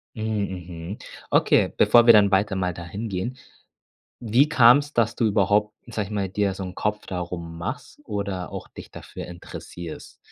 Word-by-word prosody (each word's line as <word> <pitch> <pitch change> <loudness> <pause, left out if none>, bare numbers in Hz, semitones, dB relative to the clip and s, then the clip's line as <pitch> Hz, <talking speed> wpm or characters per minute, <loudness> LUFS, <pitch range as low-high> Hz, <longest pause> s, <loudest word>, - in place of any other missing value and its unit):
Mhm, 110 -2 -2
mhm, 90 +1 -7 0.3
okay, - - +3
bevor 120 -1 +6
wir 115 - +9
dann 105 -2 +6
weiter 95 0 +1
mal 90 -2 -1
dahin 95 +6 -6
gehen. 95 +6 -3 0.9
Wie 120 +5 +3
kam's, 145 +1 +5
dass 115 0 +2
du 115 - +1
überhaupt, 105 0 +2
sage 110 -4 -3
ich - - -12
mal, 100 -3 -2
dir 100 -1 0
so 95 - -6
'n 90 0 -7
Kopf 105 +1 -2
darum 85 -2 -5
machst 85 - -6
oder 100 -4 -4
auch - - -7
dich - - -12
dafür - - -9
interessierst, 85 -1 -9
100 Hz, 170 wpm, -24 LUFS, 90-110 Hz, 0.9 s, wir